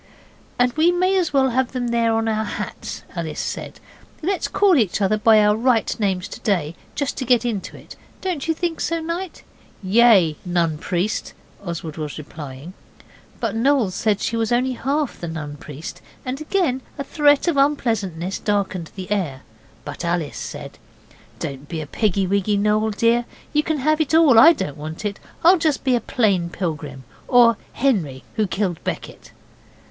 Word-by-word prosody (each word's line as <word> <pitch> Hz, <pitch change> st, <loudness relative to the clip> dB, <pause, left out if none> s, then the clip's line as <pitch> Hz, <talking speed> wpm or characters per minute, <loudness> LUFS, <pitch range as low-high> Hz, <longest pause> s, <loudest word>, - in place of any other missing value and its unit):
'And 245 Hz, 0 st, +2 dB
we 320 Hz, +3 st, +4 dB
may 365 Hz, +2 st, +2 dB
as 360 Hz, -4 st, +1 dB
well 270 Hz, -2 st, +3 dB
have 260 Hz, +1 st, 0 dB
them 245 Hz, -2 st, -2 dB
there 235 Hz, -1 st, +2 dB
as -, -, +2 dB
on 225 Hz, 0 st, 0 dB
our 220 Hz, -1 st, 0 dB
hats,' 210 Hz, -, -6 dB
Alice -, -, -4 dB
said. -, -, -5 dB, 0.4 s
'And 345 Hz, +5 st, -1 dB
let's 385 Hz, -, -1 dB
call 400 Hz, -3 st, +4 dB
each 220 Hz, -7 st, +1 dB
other 200 Hz, +1 st, +2 dB
by 215 Hz, 0 st, +5 dB
our 210 Hz, 0 st, +4 dB
right 230 Hz, 0 st, +2 dB
names 190 Hz, -3 st, 0 dB
to -, -, -8 dB
day, 170 Hz, -7 st, 0 dB, 0.2 s
just 285 Hz, -2 st, -2 dB
to 265 Hz, -, -2 dB
get 245 Hz, -1 st, +3 dB
into 215 Hz, -5 st, -3 dB
it. -, -, -13 dB, 0.2 s
Don't 355 Hz, -7 st, -3 dB
you 325 Hz, -, +1 dB
think 340 Hz, 0 st, -2 dB
so, 335 Hz, 0 st, 0 dB
Knight?' 335 Hz, +2 st, -5 dB, 0.4 s
'Yea, 190 Hz, -6 st, +5 dB
Nun 170 Hz, -4 st, 0 dB
Priest,' 185 Hz, +7 st, -2 dB, 0.3 s
Oswald 165 Hz, -4 st, -5 dB
was 150 Hz, -2 st, -5 dB
replying, 150 Hz, +1 st, -9 dB, 0.7 s
but -, -, -2 dB
Noel 245 Hz, -3 st, +2 dB
said 210 Hz, +1 st, 0 dB
she 230 Hz, -, -1 dB
was 225 Hz, 0 st, 0 dB
only 250 Hz, +2 st, +2 dB
half 275 Hz, +3 st, -2 dB
the 170 Hz, -, -4 dB
Nun 155 Hz, -3 st, -5 dB
Priest, 150 Hz, +3 st, -9 dB, 0.2 s
and 260 Hz, +3 st, -4 dB
again 310 Hz, -6 st, 0 dB, 0.2 s
a 280 Hz, -, -3 dB
threat 290 Hz, +2 st, +3 dB
of 340 Hz, -, +2 dB
unpleasantness 220 Hz, -, 0 dB
darkened 195 Hz, -5 st, -1 dB
the 190 Hz, 0 st, -7 dB
air. 165 Hz, -11 st, -1 dB, 0.4 s
But -, -, -6 dB
Alice 170 Hz, -3 st, -1 dB
said -, -, -7 dB, 0.6 s
'Don't 140 Hz, +1 st, -6 dB
be 165 Hz, -, -4 dB
a 155 Hz, -, -4 dB
piggy 195 Hz, +4 st, 0 dB
wiggy, 200 Hz, +2 st, +1 dB
Noel, 210 Hz, +2 st, +2 dB
dear; 230 Hz, +3 st, +2 dB, 0.3 s
you 300 Hz, -, +4 dB
can 315 Hz, 0 st, -1 dB
have 310 Hz, +3 st, +2 dB
it 310 Hz, 0 st, +1 dB
all, 300 Hz, -8 st, +7 dB
I 325 Hz, -, +10 dB
don't 145 Hz, -, -4 dB
want 155 Hz, +6 st, -7 dB
it. 200 Hz, -1 st, -3 dB, 0.2 s
I'll 350 Hz, +2 st, +6 dB
just 310 Hz, -3 st, 0 dB
be 260 Hz, -2 st, +3 dB
a 240 Hz, -, 0 dB
plain 200 Hz, -8 st, +1 dB
pilgrim, 150 Hz, -7 st, -4 dB, 0.2 s
or 240 Hz, -2 st, +6 dB, 0.2 s
Henry 180 Hz, -, 0 dB
who 215 Hz, -2 st, 0 dB
killed 185 Hz, -3 st, -2 dB
Becket. -, -, -6 dB
220 Hz, 180 wpm, -21 LUFS, 180-275 Hz, 0.7 s, I